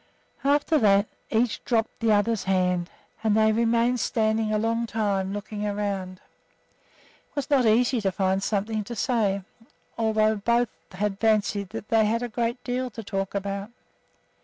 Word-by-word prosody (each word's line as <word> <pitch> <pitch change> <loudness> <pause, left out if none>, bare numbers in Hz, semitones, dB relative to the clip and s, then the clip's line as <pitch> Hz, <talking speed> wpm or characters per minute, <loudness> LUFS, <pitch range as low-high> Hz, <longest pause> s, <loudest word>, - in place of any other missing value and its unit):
After 290 +2 +3
that, 200 -2 +4 0.2
each 230 0 0
dropped 225 -2 -1
the 230 -1 +2
other's 210 +1 +2
hand 180 -2 +1 0.3
and 215 -1 +3
they 220 0 +4
remained 235 +2 +2
standing 220 -1 +1
a 215 - +2
long 230 +2 0
time, 200 -4 -1
looking 205 +1 -5
around. 200 -3 -3 1.1
It - - -36
was 285 +1 -3
not 260 -5 +4
easy 235 +2 +3
to 195 -2 +1
find 190 0 0
something 215 +2 -1
to 235 - -6
say, 205 -4 0 0.6
although 220 -1 +2
both 235 +3 +1 0.2
had 200 +1 -2
fancied 210 -3 +1
that 210 - -7
they 220 -1 +4
had 230 +3 0
a 245 - -3
great 235 +2 -2
deal 250 +1 -2
to 225 -1 -8
talk 195 -1 -3
about. 200 +1 -3
215 Hz, 160 wpm, -25 LUFS, 200-230 Hz, 1.1 s, that